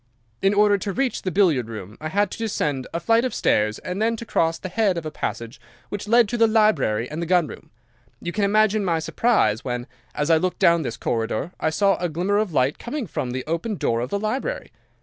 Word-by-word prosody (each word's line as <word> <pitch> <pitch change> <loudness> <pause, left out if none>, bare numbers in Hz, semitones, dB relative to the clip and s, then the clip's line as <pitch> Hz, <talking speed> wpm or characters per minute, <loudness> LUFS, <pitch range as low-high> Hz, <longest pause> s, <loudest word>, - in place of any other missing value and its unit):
"'In 195 +1 +3
order 205 -1 +4
to 195 +1 -3
reach 265 +2 -1
the 185 - -2
billiard 165 - +2
room 105 -2 -8
I 155 - -3
had 200 +3 +1
to - - -6
descend 150 - -2
a 170 - -2
flight 230 +5 +3
of 255 - -2
stairs 105 0 +1
and 180 +3 -5
then 230 +1 +2
to 235 - -8
cross 165 -6 +1
the - - -6
head 195 -1 +1
of 165 - -4
a 155 - -4
passage 115 -3 -5 0.3
which 205 0 -5
led 235 0 +5
to 240 - -2
the 225 - +6
library 165 - +2
and 150 +4 -5
the 170 - -3
gun 175 -1 +3
room. - - -11 0.5
You 175 - -4
can 205 +3 -1
imagine 215 +1 +3
my 170 -4 +1
surprise 160 - +1
when, 120 -1 -3 0.3
as 150 +3 0
I 165 - +6
looked 180 +3 -1
down 170 -1 +4
this 120 -5 -4
corridor, 115 +7 -2
I - - +1
saw 195 +4 +2
a 175 0 -2
glimmer 185 +6 0
of 215 -4 -1
light 135 -1 +1
coming 270 +1 -4
from 135 -7 -4
the 130 +1 -4
open 170 +7 -2
door 115 -9 0
of 125 +2 -3
the 200 - -1
library. 255 - -3
180 Hz, 235 wpm, -23 LUFS, 140-210 Hz, 0.5 s, the